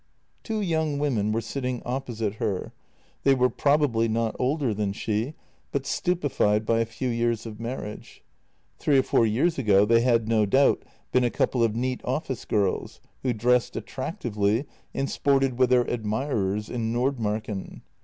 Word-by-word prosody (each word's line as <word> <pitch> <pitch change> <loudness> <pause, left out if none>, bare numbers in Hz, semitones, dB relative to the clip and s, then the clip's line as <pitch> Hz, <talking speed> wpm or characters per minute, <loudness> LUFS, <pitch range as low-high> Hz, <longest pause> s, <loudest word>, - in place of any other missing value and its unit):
Two 220 -2 -2
young 160 -5 0
women 120 -8 0
were 115 +1 0
sitting 125 +2 -3
opposite 120 -5 -3
her. 95 -4 -2 0.5
They 135 -1 +4
were 125 -1 +2
probably 140 -6 +2
not 115 0 0
older 130 -2 +1
than 100 -1 -1
she, 110 +7 -2 0.4
but 140 -1 -2
stupefied 135 - +1
by 115 +1 +2
a 115 - +1
few 125 +3 -3
years 115 -1 0
of 110 -2 -8
marriage. 115 -2 -7 0.6
Three 145 -2 +3
or 130 - +4
four 115 - +3
years 135 +10 +1
ago 105 -5 +4
they 115 +2 +4
had 115 -2 +2
no 110 -2 +3
doubt 135 +7 +4 0.3
been 125 +1 +3
a 120 - +3
couple 120 +1 +1
of 110 -2 +1
neat 125 +2 -1
office 130 -2 -3
girls, 100 -3 -1 0.2
who 130 - 0
dressed 120 +2 +2
attractively 120 - -2 0.3
and 135 - -2
sported 135 -3 +1
with 130 -1 +4
their 125 -1 +5
admirers 105 -3 -1
in 115 -2 -2
Nordmarken. 110 -5 -2
120 Hz, 160 wpm, -26 LUFS, 110-135 Hz, 0.6 s, their